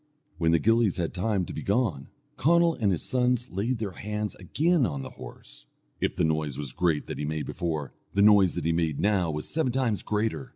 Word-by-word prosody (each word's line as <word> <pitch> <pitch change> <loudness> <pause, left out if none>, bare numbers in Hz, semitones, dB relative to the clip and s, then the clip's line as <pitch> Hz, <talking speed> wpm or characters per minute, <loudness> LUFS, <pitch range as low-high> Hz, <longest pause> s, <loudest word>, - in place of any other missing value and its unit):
When 80 -1 +3
the 85 - +5
gillies 115 0 +2
had 85 -2 -2
time 95 0 0
to - - -7
be - - -5
gone, 100 - 0 0.3
Conall 170 +3 +4
and 105 -9 +1
his 85 - -1
sons 125 -1 0
laid 115 +7 -1
their 110 -3 -3
hands 105 +2 -4
again 155 - +1
on 70 - -1
the - - -8
horse. - - -12 0.3
If - - -1
the - - 0
noise 80 -3 0
was 70 -3 -4
great 85 -4 0
that - - -6
he - - -2
made 75 0 -2
before, 80 -5 -3 0.2
the 100 - +3
noise 100 -4 +6
that 90 -3 -3
he 85 - +2
made 80 -3 0
now 100 -5 +2
was 75 -1 -4
seven 155 -6 0
times 120 -5 0
greater. 110 +5 -2
100 Hz, 215 wpm, -27 LUFS, 80-115 Hz, 0.3 s, noise